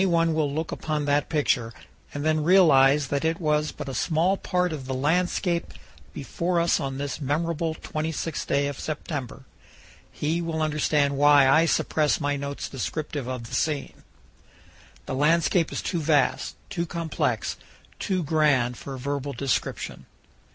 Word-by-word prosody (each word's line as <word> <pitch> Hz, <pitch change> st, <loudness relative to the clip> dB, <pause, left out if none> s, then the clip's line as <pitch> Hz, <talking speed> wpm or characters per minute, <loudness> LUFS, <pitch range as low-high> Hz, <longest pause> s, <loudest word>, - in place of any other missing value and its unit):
331 170 Hz, -3 st, +3 dB
one 160 Hz, -, 0 dB
will 150 Hz, -3 st, +1 dB
look 160 Hz, +3 st, -3 dB
upon 150 Hz, -2 st, -2 dB
that 145 Hz, 0 st, +1 dB
picture, 135 Hz, -7 st, +1 dB, 0.4 s
and 145 Hz, +1 st, -4 dB
then 155 Hz, -1 st, +2 dB
realize 150 Hz, -6 st, +5 dB
that 140 Hz, +1 st, -1 dB
it 160 Hz, +1 st, 0 dB
was 150 Hz, -2 st, +1 dB
but -, -, -8 dB
a 135 Hz, -, -4 dB
small 160 Hz, -, +1 dB
part 180 Hz, -3 st, -1 dB
of 135 Hz, -4 st, -6 dB
the 130 Hz, -, -2 dB
landscape 170 Hz, +4 st, 0 dB, 0.4 s
before 170 Hz, +5 st, -2 dB
us 170 Hz, 0 st, +2 dB
on 135 Hz, -3 st, -3 dB
this 145 Hz, +2 st, -4 dB
memorable 160 Hz, +3 st, -1 dB
26th 155 Hz, 0 st, -4 dB
day 140 Hz, 0 st, +1 dB
of 140 Hz, -1 st, -4 dB
September, 145 Hz, -4 st, -5 dB, 0.7 s
he 160 Hz, +3 st, -1 dB
will 165 Hz, -1 st, -3 dB
understand 150 Hz, -2 st, +1 dB
why 145 Hz, -1 st, +6 dB
I 160 Hz, +5 st, +5 dB
suppress 155 Hz, -2 st, +1 dB
my 145 Hz, -2 st, 0 dB
notes 140 Hz, 0 st, -4 dB
descriptive 145 Hz, 0 st, -4 dB
of 130 Hz, -2 st, -4 dB
the 115 Hz, -, -10 dB
scene. 150 Hz, -3 st, -2 dB, 1.0 s
The -, -, -4 dB
landscape 165 Hz, +4 st, +2 dB
is -, -, -4 dB
too 175 Hz, -, -1 dB
vast, 150 Hz, -3 st, +1 dB, 0.2 s
too 170 Hz, -3 st, -2 dB
complex, 165 Hz, -1 st, -2 dB, 0.4 s
too 185 Hz, -3 st, -1 dB
grand 140 Hz, -6 st, +2 dB
for 135 Hz, -1 st, -7 dB
verbal 140 Hz, +1 st, -3 dB
description. 135 Hz, +1 st, -3 dB
150 Hz, 155 wpm, -25 LUFS, 140-165 Hz, 1.0 s, why